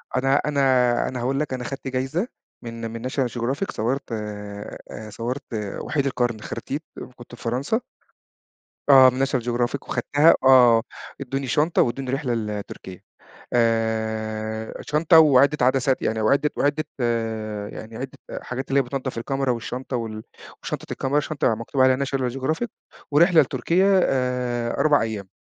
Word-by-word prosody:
أنا 135 +1 +2
أنا 150 -1 0 0.5
أنا 125 - -4
هاقول 135 +3 -1
لك، 150 -3 -2
أنا 125 - -4
خَدت 135 +2 -6
جايزة 130 - -1 0.3
من 115 -1 -6
من 115 +2 -5
National 130 -1 0
Geographic 130 +10 -2
صوَّرت 125 +5 -2
آآ، 105 0 -7
صوَّرت 120 +6 -4 0.4
وحيد 140 -3 -1
القرن، 120 -4 -1
خرتيت 145 +8 -5 0.3
كنت 120 0 -12
في - - -15
فرنسا. 130 - -1 1.1
آه، 130 -2 +9
من 130 +2 0
National 135 -2 -1
Geographic 120 +2 -1
وخدتها، 150 +3 +4
آه، 125 -3 +7 0.4
ادّوني 135 0 -3
شنطة 150 +6 +2
وادّوني 125 +2 -1
رحلة 135 -2 -1
لتركيا، 105 -4 -5 0.5
آآ، 110 -1 -1
شنطة 155 +2 +4
وعِدَّة 140 -2 +5
عدسات 130 0 +2
يعني 110 0 0
وعِدّة 140 +7 +2
وعِدّة 145 +2 +1 0.9
يعني 110 +1 -9
عِدَّة 130 +2 -7 0.2
حاجات 130 +2 -5
اللي 140 +1 +3
هي - - 0
بِتنضَّف 130 -1 -4
الكاميرا 135 +2 -1
والشّنطة 125 +2 -3
وال 110 -2 -5 0.4
وشنطة - - -5
الكاميرا، 140 +2 0
شنطة 145 -6 0
مكتوب 115 +4 -1
عليها 130 0 +5
National 130 -2 -1
Geographic 145 - -1 0.4
ورحلة 165 +3 +6
لتركيا 180 +9 +2
آآ 125 -2 -1
4 150 -4 +4
أيام. 110 -4 -4
130 Hz, 140 wpm, -23 LUFS, 115-140 Hz, 1.1 s, آه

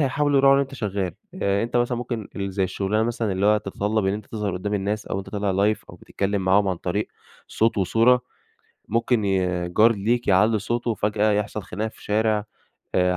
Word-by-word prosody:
هيحاولوا 145 0 +2
يراعوا 135 0 +6
إن 140 - +4
أنت 135 0 -4
شغَّال، 100 -6 -3 0.3
آآ 100 +1 +1
أنت 120 +1 -2
مثلًا 120 0 +1
ممكن 120 -4 -4
ال 100 0 -3
زي 95 0 +1
الشُّغلانة 100 +3 -1
مثلًا 115 -2 -1
اللي 95 +2 +1
هو 105 - +5
تتطلب 105 0 -1
إن 95 - +2
أنت 105 0 -5
تظهَر 105 -3 -3
قُدّام 100 +3 -3
الناس، 105 +2 -2
أو - - -3
أنت 95 0 -7
طالع 100 -1 -1 0.2
Live - - -18
أو - - -12
بتتكلّم 100 0 -2
معاهم 95 +2 +3
عن 95 - -1
طريق 95 +5 -2 0.4
صوت 115 -1 +1
وصورة، 115 +6 +4 0.7
ممكن 115 0 +1
ي 90 -2 0
جار 110 +6 +5
ليك 115 +3 0
يعلِّي 105 +3 +4
صوته، 120 +3 -1
فجأة 105 0 +1
يحصَل 105 +1 -1
خناقة 105 +5 -4
في - - -18
شارع، 105 0 +1 0.5
آآ 90 0 +2
105 Hz, 200 wpm, -23 LUFS, 100-115 Hz, 0.7 s, يراعوا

